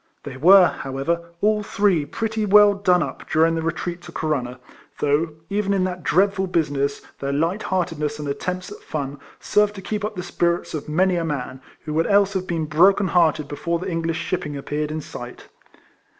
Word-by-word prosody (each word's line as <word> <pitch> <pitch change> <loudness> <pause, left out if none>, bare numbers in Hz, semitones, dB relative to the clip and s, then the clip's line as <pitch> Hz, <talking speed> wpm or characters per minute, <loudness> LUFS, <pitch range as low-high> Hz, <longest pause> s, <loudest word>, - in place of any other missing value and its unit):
They 140 -3 -7
were, 180 +7 +7
however, 170 +4 -2
all 210 0 +2
three 200 -6 +1
pretty 220 +6 -2
well 205 0 +6
done 180 -3 +2
up - - -8
during 160 +1 +3
the 165 - -1
retreat 170 +2 -3
to - - -11
Corunna; 130 -5 -2 0.4
though, 150 +2 +1
even 200 +1 0
in 190 - +1
that 180 -1 -3
dreadful 195 +1 +2
business, 145 -5 -1 0.2
their 140 0 -2
light 165 +8 0
heartedness 160 -5 -1
and 150 -1 -5
at 140 - -3
tempts 180 0 -4
at - - -9
fun 140 -2 -5 0.2
served 210 0 +2
to 195 - -7
keep 210 +2 -3
up 210 +1 -3
the 180 - -4
spirits 170 -1 -1
of 150 -1 -5
many 180 +3 +2
a 170 - -1
man, 135 -4 -4 0.2
who 155 - -4
would 165 +1 +1
else 200 -1 +3
have 185 -1 -2
been 165 -2 -1
broken 185 +5 +4
hearted 160 -4 +2
before 170 +4 -2
the 185 +2 -5
English 165 -1 -1
shipping 150 -6 -3
appeared 150 +2 -3
in 155 +1 -4
sight. 120 -3 -10
170 Hz, 195 wpm, -22 LUFS, 150-190 Hz, 0.4 s, were